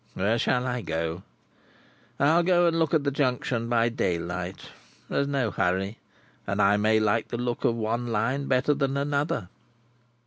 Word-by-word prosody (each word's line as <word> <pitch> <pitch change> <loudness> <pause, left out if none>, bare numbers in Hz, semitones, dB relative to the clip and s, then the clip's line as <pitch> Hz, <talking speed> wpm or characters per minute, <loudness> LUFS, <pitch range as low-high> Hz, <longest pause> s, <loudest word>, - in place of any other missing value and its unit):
Where 110 +5 +1
shall 125 +2 +1
I 125 -1 -2
go? 80 -1 -3 1.0
I'll 155 +5 +4
go 175 0 +3
and 165 -1 +2
look 160 0 +2
at 150 - +2
the 140 - 0
Junction 125 -4 -1
by 120 -1 +3
daylight. 90 -3 -3 0.4
There's 140 - 0
no 135 -6 0
hurry, 95 +3 -1 0.5
and - - -2
I 100 +1 +5
may 110 +1 +3
like 110 +1 +1
the 120 - -4
look 120 0 -3
of 115 - +2
one 115 +2 -2
Line 120 +5 -1
better 130 +3 +2
than 140 -1 -1
another." 140 - -1
120 Hz, 165 wpm, -26 LUFS, 105-140 Hz, 1.0 s, I